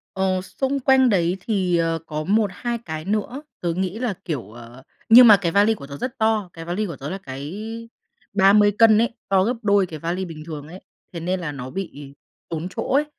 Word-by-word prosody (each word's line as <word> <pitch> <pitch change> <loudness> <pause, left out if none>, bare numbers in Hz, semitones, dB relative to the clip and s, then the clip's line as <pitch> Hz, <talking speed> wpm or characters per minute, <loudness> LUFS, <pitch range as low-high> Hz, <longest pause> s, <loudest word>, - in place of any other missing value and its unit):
Ờ, 190 -1 0
xung 270 +7 -2
quanh 265 0 +4
đấy 180 -4 +1
thì, 190 -4 0
ờ, 165 0 0
có 155 -1 -4
1-2 215 +4 0
cái 155 -1 -6
nữa, 215 - -2 0.2
tớ 170 -1 -1
nghĩ 185 +3 -2
là 240 -4 -2
kiểu, 135 - -4
ờ, 120 +2 -13 0.3
nhưng 240 +2 +10
mà 215 -3 +9
cái 175 -4 -2
vali 205 +4 +4
của 140 - -10
tớ 140 0 -8
rất 255 - -5
to, 220 -4 +1
cái 165 - -9
vali 180 +6 -2
của 170 -6 -6
tớ 140 +3 -7
là 190 - -4
cái 140 0 -7 0.8
30 205 +1 +5
cân 225 -2 +6
ấy, 230 +1 +1
to 190 -1 +3
gấp 240 +4 0
đôi 200 -2 +3
cái 160 -3 -8
vali 175 +4 -3
bình 160 -4 -9
thường 150 -3 -7
ấy, 180 +4 -10 0.3
thế 170 - -6
nên 180 +3 -2
là 160 -4 -4
nó 130 -2 -7
bị 145 -6 -7 0.3
tốn 165 +1 -4
chỗ - - -1
ấy. 290 +2 +4
185 Hz, 220 wpm, -22 LUFS, 165-215 Hz, 0.8 s, nhưng